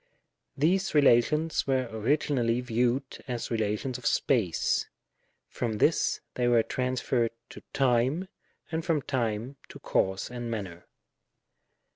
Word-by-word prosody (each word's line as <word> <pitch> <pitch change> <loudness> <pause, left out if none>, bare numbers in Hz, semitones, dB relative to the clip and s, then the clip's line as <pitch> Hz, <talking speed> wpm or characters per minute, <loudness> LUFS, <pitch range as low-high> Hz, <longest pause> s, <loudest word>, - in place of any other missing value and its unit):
These 180 +5 +1
relations 150 +4 +3
were 130 -2 +1
originally 120 +1 +1
viewed 125 +2 -1
as 120 -2 -4
relations 110 +3 -1
of 120 - -2
space; 100 -11 +1 0.6
from 115 -2 -3
this 130 +9 +2
they 125 -1 0
were 120 -2 +4
transfeiTed 125 -2 0 0.2
to - - -10
time, 135 +7 +1 0.4
and 160 0 -2
from 160 -5 0
time 120 +1 -2
to - - -10
cause 95 +4 -1
and 120 -1 -5
manner. 95 -7 -6
125 Hz, 115 wpm, -28 LUFS, 115-140 Hz, 0.6 s, were